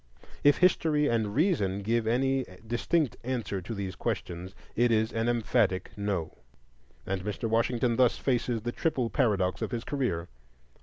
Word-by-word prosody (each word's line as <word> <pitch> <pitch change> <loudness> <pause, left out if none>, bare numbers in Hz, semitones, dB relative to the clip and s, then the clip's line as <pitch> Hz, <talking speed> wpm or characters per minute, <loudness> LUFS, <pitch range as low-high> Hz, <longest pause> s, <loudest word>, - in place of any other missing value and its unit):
If 145 0 +6
history 160 -4 +3
and 110 -4 0
reason 105 - +1
give 115 +1 +1
any 135 +3 +2 0.2
distinct 120 +4 0
answer 115 -6 -2
to 110 +6 -6
these 95 -2 -4
questions, 90 +3 -4 0.2
it 120 +1 +3
is 110 +1 +2
an 115 +1 0
emphatic 115 -5 +1
No. 100 -6 -3 0.7
And 95 -1 -2
Mr. 105 +3 -3
Washington 115 +1 +1
thus 125 -2 +4
faces 120 -3 0
the 120 - -2
triple 125 -5 -1
paradox 100 -9 +1
of - - -1
his 120 -2 -3
career: 125 - -1
1. 85 - -12
115 Hz, 155 wpm, -29 LUFS, 100-130 Hz, 0.7 s, If